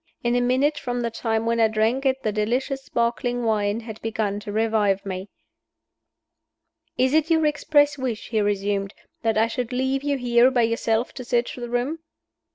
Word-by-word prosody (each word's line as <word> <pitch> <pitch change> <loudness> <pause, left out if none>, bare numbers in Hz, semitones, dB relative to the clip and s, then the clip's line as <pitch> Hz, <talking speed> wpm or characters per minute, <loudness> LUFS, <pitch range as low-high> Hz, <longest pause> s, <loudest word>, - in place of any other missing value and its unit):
In 240 0 +1
a 245 - +2
minute 270 +5 +2
from 245 -1 -3
the 235 -1 -2
time 225 -1 -1
when 230 0 +1
I 225 - +5
drank 220 +5 +1
it 265 0 0
the 215 - 0
delicious 250 +6 -1
sparkling 240 +1 -1
wine 215 -1 0
had 220 -2 -9
begun 215 -2 -2
to 205 0 -7
revive 215 -3 +1
me. 190 0 -5 1.7
"Is 260 +2 +2
it 315 +1 +3
your 320 -1 +3
express 295 -1 +2
wish," 245 -4 -3
he 220 -2 +1
resumed, 200 -1 -1 0.3
"that 225 -2 +1
I 220 - +4
should 235 +1 -3
leave 265 +2 0
you 285 -1 0
here 245 0 +4
by 250 -3 +2
yourself 230 0 0
to 255 - -7
search 240 0 0
the 240 -1 -6
room?" 250 +7 -1
235 Hz, 180 wpm, -24 LUFS, 220-260 Hz, 1.7 s, I